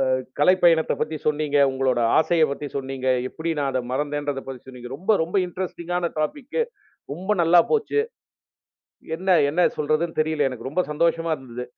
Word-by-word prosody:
அ 130 - -2 0.2
கலைப்பயணத்தப் 170 -1 +4
பத்தி 155 - -1
சொன்னீங்க, 150 -1 +1
உங்களோட 130 -2 0 0.2
ஆசையப் 160 -1 +3
பத்தி 145 +1 -4
சொன்னீங்க. 135 -1 -4 0.2
எப்படி 165 +4 -5
நான் 140 - 0
அத 130 - 0
மறந்தேன்றதப் 145 0 -2
பத்தி 130 -2 -7
சொன்னீங்க. 125 -1 -9
ரொம்ப 195 +6 +2
ரொம்ப 170 +5 -6
இன்ட்ரஸ்டிங்கான 175 -1 -3
டாபிக்கு. 280 - -2 0.5
ரொம்ப 190 +6 -3
நல்லா 170 +1 +6
போச்சு. 435 -1 +2 1.2
என்ன 190 +3 -2 0.2
என்னா 175 +4 +2
சொல்றதுன்னு 155 +3 0
தெரியல, 155 -2 +1
எனக்கு. 130 +1 -6
ரொம்ப 180 +4 +1
சந்தோஷமா 165 +1 +1
இருந்துது. 125 -2 -7
155 Hz, 150 wpm, -23 LUFS, 135-175 Hz, 1.2 s, நல்லா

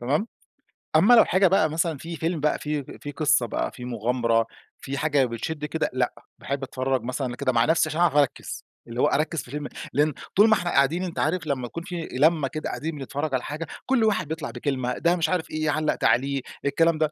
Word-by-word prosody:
تمام؟ 145 - 0 0.7
أما 195 +10 +6
لو 235 - +8
حاجة 185 +1 +4
بقى 170 -4 +3
مثلًا 160 -1 -1
في 165 +4 -7
فيلم 165 +1 -2
بقى 150 +1 +1
في 150 -1 -2 0.2
فيه 145 - -5
قصّة 145 -4 +3
بقى - - -2
فيه 125 - -9
مغامرة 115 -1 +1 0.3
في 140 +1 -4
حاجة 145 -2 +2
بتشد 135 +6 -4
كده، 155 +2 -1
لأ، 125 -1 0 0.3
باحب 140 0 -3
أتفرّج 130 -1 -1
مثلًا 125 0 -3
كده 135 -1 0
مع 115 -1 +3
نفسي 160 0 +3
عشان 155 +2 -1
أعرف 170 -5 +3
أركز، 145 -3 0 0.2
اللي 120 +2 -3
هو 145 - +5
أركز 155 +1 0
في - - -14
الفيلم، 145 +3 -5 0.3
لأن 150 +1 +2 0.2
طول 210 +3 +7
ما - - +6
إحنا 175 -4 0
قاعدين 145 +7 +2
أنت 180 -3 -4
عارف 160 +1 0
لمّا 130 -3 -1
يكون 170 +7 -7
في 175 -3 -5
لمة 150 +1 +3
كده 155 +3 -4
قاعدين 160 +1 -4
بنتفرج 140 +2 -4
على 130 - 0
حاجة 155 +3 -5 0.2
كل 260 -4 +2
واحد 200 -6 +1
بيطلع 160 +1 -4
بكلمة، 130 -3 -2
ده 170 +1 +2
مش 165 -3 0
عارف 180 -3 -1
إيه 155 0 -1
علَّق 155 +1 +1
تعليق، 135 +3 +1 0.2
الكلام 165 +3 +3
ده، 155 -1 +1
150 Hz, 215 wpm, -25 LUFS, 135-165 Hz, 0.7 s, لو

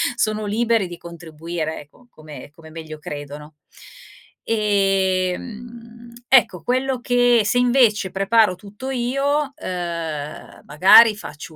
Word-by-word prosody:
sono 215 -2 -1
liberi 225 -1 0
di 175 - -9
contribuire, 165 -1 -7
eco, 150 +12 -21
come 155 -2 -12
come 165 -1 -15
meglio 155 -1 -9
credono. 150 +1 -9 0.9
Ehm, 195 -4 0
mhmm, 235 0 -12
ecco 235 -9 +3
quello 260 +1 -1
che 245 -1 +3
se 245 - +1
invece 240 -5 +2
preparo 195 +1 +2
tutto 210 +7 -10
io, 275 +3 -1
uhm, 165 -4 -6
magari 195 +9 +6
faccio 155 -5 -10
200 Hz, 115 wpm, -20 LUFS, 165-235 Hz, 0.9 s, magari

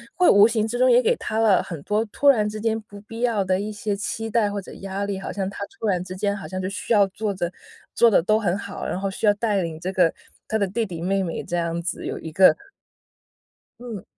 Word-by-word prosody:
会 360 - +4
无 205 +1 +7
形 220 -2 0
之 240 +2 -3
中 255 0 +5
也 245 +1 +6
给 - - +3
他 215 - -4
了 220 -4 +4
很 165 -4 -7
多 210 +5 +1
突 255 +6 -1
然 215 -7 +5
之 215 - -6
间 220 0 0
不 205 -1 -13
必 225 +2 -9
要 230 -5 +1
的 185 0 +1
一 210 +2 -3
些 210 0 -3
期 220 +2 -4
待 215 -2 +2
或 205 - -3
者 195 - -10
压 195 +1 -3
力， 200 -1 -3
好 - - -5
像 195 -2 -3
他 - - -10 0.2
突 - - -4
然 180 -3 +1
之 185 0 -8
间 200 +1 -1
好 200 - -7
像 185 - -5
就 185 - -2
需 195 +4 -6
要 205 -2 +6
做 205 +2 -3
着 175 -2 -3 0.4
做 235 - +5
得 190 -6 +3
都 215 +3 +3
很 195 -4 0
好， 200 0 -6
然 185 - -3
后 195 0 -2
需 210 - -1
要 205 - +6
带 205 -2 0
领 165 -2 -4
这 185 +3 -4
个 180 -3 +4 0.4
他 220 - 0
的 205 - +1
弟 210 +5 -1
弟 180 -6 -6
妹 195 +3 0
妹 170 -3 -3
这 175 - -4
样 170 0 -1
子 170 +1 -4
有 - - -4
一 160 - -7
个 185 +4 +6 1.2
嗯。 235 -6 -7
200 Hz, 285 characters per minute, -23 LUFS, 185-220 Hz, 1.2 s, 无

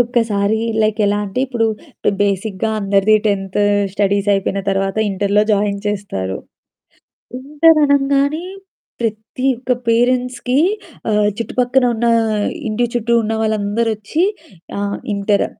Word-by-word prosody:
ఒక్కసారి 220 -3 0 0.2
లైక్ 215 0 0
ఎలా 205 +1 +1
అంటే, 200 +6 -3
ఇప్పుడు 235 -3 0 0.6
బేసిక్‌గా 200 +1 -1
అందరిదీ 200 +2 +3
10థ్ 195 -1 -1 0.3
స్టడీస్ 200 0 0
అయిపోయిన 195 0 -1
తర్వాత, 195 +1 -1
ఇంటర్‌లో 200 +2 +1
జాయిన్ 200 0 +1
చేస్తారు. 145 - -3 1.0
ఇంటర్ 300 +4 +3
అనంగానే 280 +3 +2 0.6
ప్రతి 225 +3 -3
ఒక్క 255 0 -1 0.2
పేరెంట్స్‌కి 250 +2 +1 0.5
ఆహ్, 210 0 +3
చుట్టుపక్కన 250 +2 +1
ఉన్న, 235 +1 -1 0.6
ఇంటి 235 +3 0
చుట్టూ 235 0 +1
ఉన్న 220 0 -2
వాళ్ళందరొచ్చి, 215 - 0 0.6
ఆహ్, 200 0 -2 0.2
ఇంటర్ 200 0 +1
215 Hz, 110 wpm, -18 LUFS, 200-245 Hz, 1.0 s, అందరిదీ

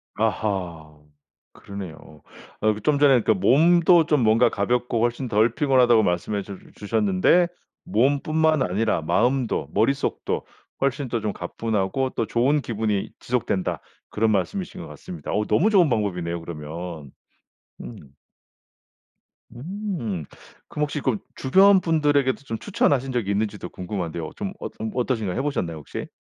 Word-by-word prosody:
아하. 90 -8 -2 0.6
그러네요. 90 -6 -10 0.4
아 110 - +3
그 105 - -9
좀 145 +5 +1
전에 135 -4 +5
그러니까 110 - +3
몸도 165 - +5
좀 150 -4 +2
뭔가 115 +2 +4
가볍고 120 +2 0
훨씬 120 +2 0
덜 110 +1 +2
피곤하다고 125 -6 +4
말씀해 95 +3 -1
주 100 -1 -9 0.2
주셨는데 105 - +2 0.4
몸뿐만 150 +6 +2
아니라 105 -2 0
마음도 120 - 0
머릿속도 135 +7 0 0.4
훨씬 140 0 0
더 115 - -1
좀 105 -1 -2
가뿐하고 110 +7 -2
또 115 - 0
좋은 135 +5 +2
기분이 110 -4 -2
지속된다 115 -6 -2 0.3
그런 110 +1 +1
말씀이신 175 - -2
것 - - -8
같습니다. 180 -2 -8
어 105 - +1
너무 195 - +3
좋은 185 -7 +4
방법이네요 90 -7 -1
그러면. 80 -2 -7 0.7
음. - - -8 1.6
음. 150 - -4 0.4
그럼 150 - -3
혹시 150 0 -2
그 130 -5 0 0.2
주변 190 +8 +5
분들에게도 145 -5 +1
좀 115 -5 -5
추천하신 135 -9 +1
적이 115 -6 -1
있는지도 100 -3 -2
궁금한데요. 85 -3 -5
좀 - - -4
엇 - - -6
음 110 0 -3
어떠신가요? 120 -6 -1
해 - - +1
보셨나요 110 - -2
혹시? 75 - -7
115 Hz, 320 characters per minute, -23 LUFS, 100-140 Hz, 1.6 s, 전에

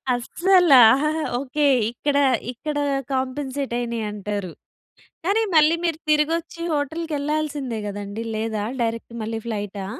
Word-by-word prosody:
అస్సల. 355 +7 +3 0.7
ఓకే. 280 +3 -1 0.3
ఇక్కడ 280 +4 -1 0.4
ఇక్కడ 295 +5 -4 0.4
కాంపెన్సేట్ 265 0 -2
అయినాయి 235 -2 -3
అంటారు. 205 -3 -4 0.8
కానీ 415 +4 +2
మళ్ళీ 310 +2 +5
మీరు 325 -2 0
తిరిగొచ్చి 330 +3 0
హోటల్‌కీ 315 +3 -2
ఎళ్ళాల్సిందే 290 -5 -2
గదండీ. 205 +2 -5
లేదా 220 -1 -2 0.2
డైరెక్ట్ 230 0 -3
మళ్ళీ 225 +1 -3
ఫ్లైటా? 205 -3 -4
265 Hz, 110 wpm, -23 LUFS, 225-305 Hz, 0.8 s, మళ్ళీ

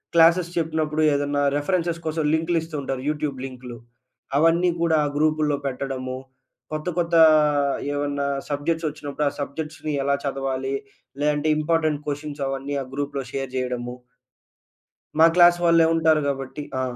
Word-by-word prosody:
Classes 170 +1 +5
చెప్పినప్పుడు 155 -1 0
ఏదన్నా 145 0 0 0.2
references 170 +2 -1
కోసం 160 0 -1
లింక్‌లు 165 +2 +1
ఇస్తూ 160 -1 -8
ఉంటారు 135 -1 -3
యూట్యూబ్ 150 -3 -2
లింక్‌లు 125 -2 -9 0.6
అవన్నీ 165 +3 +4
కూడా 165 -1 +3
ఆ - - 0
గ్రూపుల్లో 155 -1 +2
పెట్టడము. 130 -1 -4 0.5
కొత్త 155 +2 -4
కొత్త 170 -1 +1 0.8
ఏమన్నా 145 0 -1 0.2
సబ్జెక్ట్స్ 160 +3 -1
వచ్చినప్పుడు 150 -1 -3
ఆ - - -9
సబ్జెక్ట్స్‌ని 150 +1 -4
ఎలా 140 0 +2
చదవాలి? 135 -1 -2 0.5
లేదంటే 150 +1 +1
ఇంపార్టెంట్ 155 -1 +1
క్వెషన్స్ 145 0 -4
అవన్నీ 135 +1 -3
ఆ - - -10
గ్రూప్‌లో 140 0 -3
షేర్ 135 -1 -3
చేయడము. 125 -1 -3 1.2
మా 160 - +9
క్లాస్ 175 -1 +7
వాళ్ళే 165 -1 +5
ఉంటారు 160 -1 +3
కాబట్టి. 135 +1 -4 0.2
ఆ! - - 0
150 Hz, 135 wpm, -23 LUFS, 140-160 Hz, 1.2 s, మా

